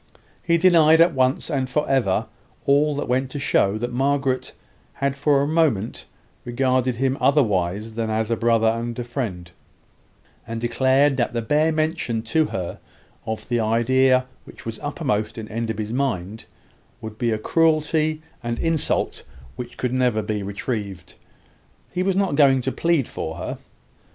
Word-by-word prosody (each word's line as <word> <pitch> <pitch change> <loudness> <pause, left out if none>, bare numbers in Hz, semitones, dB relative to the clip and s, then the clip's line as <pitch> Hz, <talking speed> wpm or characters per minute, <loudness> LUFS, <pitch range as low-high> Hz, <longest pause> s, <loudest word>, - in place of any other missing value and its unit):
He 170 -1 +2
denied 165 -3 +5
at 170 +1 +5
once 130 +4 0
and 135 -3 -1
for 150 +3 0
ever, 125 -9 +1 0.4
all 145 +1 +3
that 145 - -3
went 130 +1 0
to 145 - -6
show 100 -6 +2
that 120 +2 -4
Margaret 135 0 0 0.4
had 140 0 -1
for 140 0 +2
a - - -1
moment 150 -10 0 0.4
regarded 130 0 0
him 135 +2 0
otherwise 105 - +1
than 115 0 -2
as 110 +1 -1
a - - +3
friend 115 0 +1
and 115 +1 -1
a 120 - -3
brother; 100 -9 -5 1.0
and 115 0 -4
declared 130 +4 +2
that 120 - 0
the 115 -1 -2
bare 150 +6 +2
mention 155 -8 -1
to 155 +8 +1
her 95 -11 -5 0.5
of 110 0 -4
the 120 -1 0
idea 130 +3 +3 0.2
which - - -14
was 115 -1 -5
uppermost 125 -8 -2
in 110 -1 -6
Enderby's 110 -1 -3
mind 110 -6 -2 0.5
would 110 -1 -9
be 120 - +1
a 110 - 0
cruelty 155 +3 +1 0.2
and 120 -1 -3
insult 165 -2 0 0.3
which 125 - -8
could 125 -1 -2
never 125 -4 +1
be 105 0 -2
retrieved. 100 -2 -5 0.8
He 180 - -2
was 190 0 +1
not 195 -4 +1
going 140 -3 +4
to 130 - -2
plead 165 -5 +1
for 80 - -5
her. 85 - -5
130 Hz, 160 wpm, -22 LUFS, 110-145 Hz, 1.0 s, denied